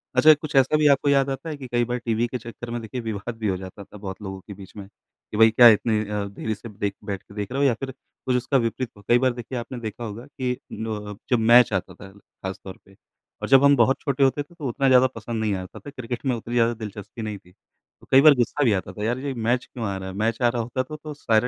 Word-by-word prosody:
अच्छा 155 0 +8
कुछ 150 0 -6
ऐसा 135 +3 +4
भी 150 0 +4
आपको 140 0 +4
याद 140 -1 +3
आता 135 +4 -4
है 150 - -5
कि 135 -2 -8
कई 120 0 +1
बार 125 +1 -2
टीवी 115 +1 +1
के 125 - -4
चक्कर 115 +1 -9
में 120 0 -3
देखिए 120 +3 -5
विवाद 110 +1 -5
भी 110 -1 -2
हो 95 -2 0
जाता 95 +2 -9
था 105 - -14
बहुत 100 0 -7
लोगों 95 -2 -6
के 100 - -7
बीच 95 -1 -13
में 100 -1 -8
कि 105 +1 -13
भई 110 0 +7
क्या 120 +2 +8
इतनी 110 0 0
अ, 105 -1 -2
देरी 110 +2 -4
से 115 +3 -10
देख 100 -1 -3
बैठ 100 -3 -4
के - - -17
देख 105 +2 -4
रहे 135 +2 -1
हो 140 - +5
या 130 - +3
फिर 135 -1 -4
कुछ 130 0 -5
उसका 125 +2 +1
विपरीत 120 +1 -1
हो? 100 - -16
कई 120 +1 +6
बार 130 -1 +2
देखिए 120 +1 -6
आपने 120 +1 -7
देखा 115 +1 -6
होगा 115 +2 -7
कि 130 -3 -3
अ, 105 -4 -6
जब 125 - +3
मैच 120 0 +6
आता 90 -1 -2
था 95 +2 -13
खास 95 -1 -9
तौर 95 -1 -9
पे 100 - -20 0.5
और - - -3
जब 135 0 +7
हम 140 0 +6
बहुत 125 +3 +3
छोटे 140 -1 0
होते 135 +2 +2
थे 145 - -22
तो 150 -5 -5
उतना 135 +3 0
ज़्यादा 130 0 +6
पसंद 115 0 -4
नहीं 105 -2 0
आता 90 - -11
था - - -10
क्रिकेट 125 -2 -6
में 130 -2 +1
उतनी 115 +1 -7
ज़्यादा 115 0 +3
दिलचस्पी 110 0 -8
नहीं 105 -2 -4
थी। 90 -2 -21
तो 90 - -28
कई 135 - +8
बार 155 0 +8
गुस्सा 125 +4 0
भी 115 -6 +4
आता 95 -2 -3
था 105 - -6
यार 120 +3 0
ये 140 0 -3
मैच 120 +1 0
क्यों 120 -3 -6
आ 100 - -2
रहा 95 0 -6
है, 95 - -8
मैच 115 +3 -1
आ 120 - +5
रहा 120 0 -1
होता 125 +3 -2
था 155 +4 -8
तो 155 -1 -6
सारे 115 -4 +1
120 Hz, 285 wpm, -24 LUFS, 105-130 Hz, 0.5 s, अच्छा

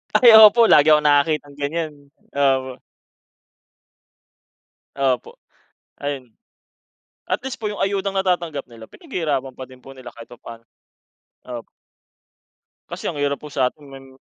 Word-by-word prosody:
Ay, 240 -2 +7
opo, 225 +2 +7
lagi 150 +1 +6
akong 150 0 +4
nakakitang 145 0 +1
ganyan. 155 +2 -3 0.4
Opo. 135 -2 0 2.2
Opo, 135 -3 -1 0.7
ayun, 135 -4 -6 1.0
at - - -2
least 265 -2 -6
po 215 - -3
yung 205 - -5
ayudang 195 0 -2
natatanggap 175 -6 -1
nila, 115 -1 -13
pinaghihirapan 150 - -4
pa 130 - -7
din 130 -1 -17
po 135 - -12
nila 130 -2 -12
kahit 115 0 -13
papano. 115 -1 -12 0.8
Opo. 120 -2 -8 1.2
Kasi - - -8
ang 145 - -8
hirap 140 0 -2
po 150 - -10
sa'tin, 135 +2 -2
mem 135 -1 -14
140 Hz, 125 wpm, -20 LUFS, 130-170 Hz, 2.2 s, Ay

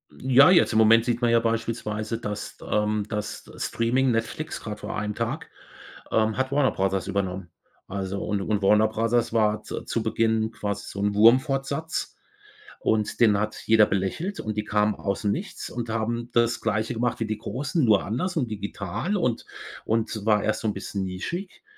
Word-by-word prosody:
Ja, 130 +3 +6
jetzt 175 - +5
im 110 - +3
Moment 115 +1 +6
sieht 120 0 -1
man 120 -1 +3
ja 115 - +5
beispielsweise, 115 -1 -2
dass, 105 -2 -6
ähm 105 0 +1
dass 105 -1 -5
Streaming, 125 +3 +1
Netflix 115 +7 -3
grad 105 -1 -6
vor - - -5
1 105 0 -2
Tag, 130 +8 -3 0.6
ähm, 110 -1 +2
hat 130 0 -1
Warner 140 -1 +3
Bros. 95 -1 -1
übernommen. 95 -2 -2 0.4
Also, 95 0 -4
und 105 -2 -1
und 105 +1 -1
Warner 105 +2 +5
Bros. 115 +2 0
war 105 -2 +2
z - - -6
zu - - -1
Beginn 110 -1 +1
quasi 105 -2 -4
so 100 - -7
'n 105 0 +1
Wurmfortsatz. 135 +7 +2 0.6
Und 110 -1 0
den 110 -4 +5
hat 105 +1 -3
jeder 110 -1 +6
belächelt 100 - -2
und 110 -1 -4
die 105 - 0
kamen 105 0 +1
aus 100 -1 -3
dem 105 -2 +1
Nichts - - -5
und 120 -1 -5
haben 115 +1 -2
das 115 0 +2
Gleiche 110 +2 -1
gemacht 120 +1 -1
wie 115 - -1
die 110 0 -2
Großen, 135 - -2
nur 110 -4 +4
anders 170 - -2
und 125 -6 0
digital 105 - -3
und 125 -10 -1 0.4
und 110 -1 -1
war 105 -2 +3
erst 110 0 0
so - - -1
'n 105 - 0
bisschen 100 0 -4
nischig. 170 - -5
110 Hz, 180 wpm, -25 LUFS, 105-120 Hz, 0.6 s, Ja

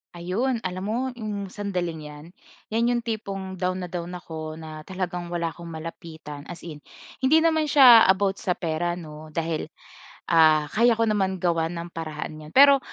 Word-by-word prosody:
Ayun 220 +8 -1
alam 185 0 -4
mo 220 - -1 0.2
'yong 205 -3 -4
sandaling 180 -6 -3
'yan, 150 0 -11 0.5
'yan 230 +2 +2
'yong 240 - -2
tipong 195 -5 -5
down 185 0 -1
na 180 - -6
down 175 0 -5
ako 160 -3 -7
na 155 -1 -9
talagang 180 -2 -4
wala 170 -1 -2
‘kong 170 +2 -11
malapitan 160 -2 -8
as 175 - -9
in. 155 -3 -8 0.4
Hindi 310 +5 +4
naman 315 -2 +2
siya 255 -6 +8
about 195 +1 +2
sa 180 -5 -1
pera 175 +1 -2
'no, 155 -2 -10
dahil 165 -2 -2 0.6
ah 155 -2 +5
kaya 235 +1 +4
ko 230 - +1
naman 190 -4 0
gawan 165 -1 +1
ng 170 +1 -6
paraan 155 -1 -6
'yan. 155 0 -11
Pero 280 0 +8
180 Hz, 170 wpm, -25 LUFS, 160-210 Hz, 0.6 s, siya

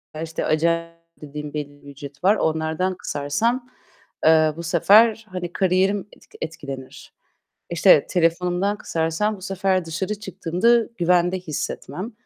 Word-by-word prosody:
ya, 160 - -4
işte, 160 0 -4
acayip 165 +1 +1 0.3
dediğim 150 0 -7
belli 145 -1 -6
bir - - -15
ücreti 140 0 -10
var. 200 +3 +5
Onlardan 160 +2 -1
kısarsam, 220 - -1 0.6
eee, 155 -1 +5
bu 170 - -6
sefer 215 +7 +4
hani 175 -1 -5
kariyerim 190 +2 +1
etk - - -21
etkilenir. 140 -4 -8 0.6
İşte 170 -3 +5
telefonumdan 180 +3 +1
kısarsam 165 +6 -1
bu - - -15
sefer 190 -1 0
dışarı 175 +6 -3
çıktığımda 200 +3 +1
güvende 180 +1 +2
hissetmem. 180 - -5
175 Hz, 125 wpm, -22 LUFS, 160-195 Hz, 0.6 s, var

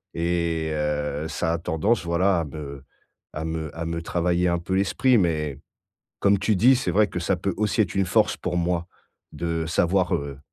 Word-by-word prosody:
et 85 -1 0
heu, 75 0 -2
ça 80 +1 -1
a 85 - 0
tendance, 90 +6 0
voilà, 90 +2 +2
à 80 - -3
me 70 -2 -8 0.5
à 80 +1 -4
me 80 -2 -4
à 85 - -3
me 85 0 -3
travailler 90 +1 0
un 85 0 0
peu 95 +2 -4
l'esprit. 115 +6 +3
Mais 75 -6 0 0.6
comme 100 0 +4
tu 100 +1 +1
dis, 125 +7 +6
c'est 130 - -1
vrai 105 0 +4
que 90 - -4
ça 90 +2 +1
peut 95 +2 -2
aussi 105 +2 0
être 90 - -4
une 95 -2 +2
force - - +2
pour 90 - -3
moi 85 0 -1 0.4
de 85 -1 -2
savoir, 90 +2 +2
heu, 70 -1 -4
85 Hz, 195 wpm, -24 LUFS, 80-95 Hz, 0.6 s, dis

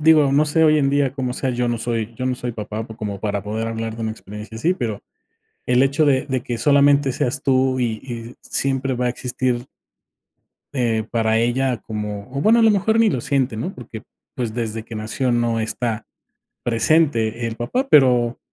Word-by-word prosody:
digo, 155 -2 +5
no 145 +2 +4
sé 160 +2 +2
hoy 155 -1 +5
en 135 -2 +2
día 140 -2 +1
cómo 130 -3 -2
sea, 130 0 -2
yo 125 0 -1
no 120 -1 -1
soy 115 -1 -3
yo 130 - -4
no 130 - 0
soy 125 -1 -4
papá 110 +1 -5
por 110 - -11
como 105 -3 -4
para 100 -1 -2
poder 110 +3 -3
hablar 115 0 -4
de 115 - -5
una 110 - -1
experiencia 105 +1 -9
así, 165 +11 +1
pero 110 - -4 0.6
el 125 0 +3
hecho 140 +3 +2
de 135 -2 +2
de 130 -3 -2
que 120 - -3
solamente 140 0 +4
seas 130 +3 -1
tú 130 -2 +2
y 115 -3 -1
y 120 -2 -7
siempre 135 -1 0
va 125 +1 -1
a - - +1
existir 125 0 -2 1.1
eh, 115 -3 +1
para 110 -1 +2
ella 120 +2 +1
como 105 -1 -5
o - - 0
bueno, 220 +9 +5
a 230 - +4
lo 225 - +6
mejor 215 +2 +2
ni 225 - +5
lo 130 - -1
siente, 130 -3 0
¿no? 175 - -3
Porque, 115 -3 -9 0.3
pues, 120 -4 -3
desde 115 -2 -3
que 115 0 -8
nació 110 +4 -1
no 120 -1 +1
está 110 0 -2 0.6
presente 115 -2 +2
el 115 - -5
papá, 245 - -2
pero 125 - +4
120 Hz, 205 wpm, -21 LUFS, 115-135 Hz, 1.1 s, lo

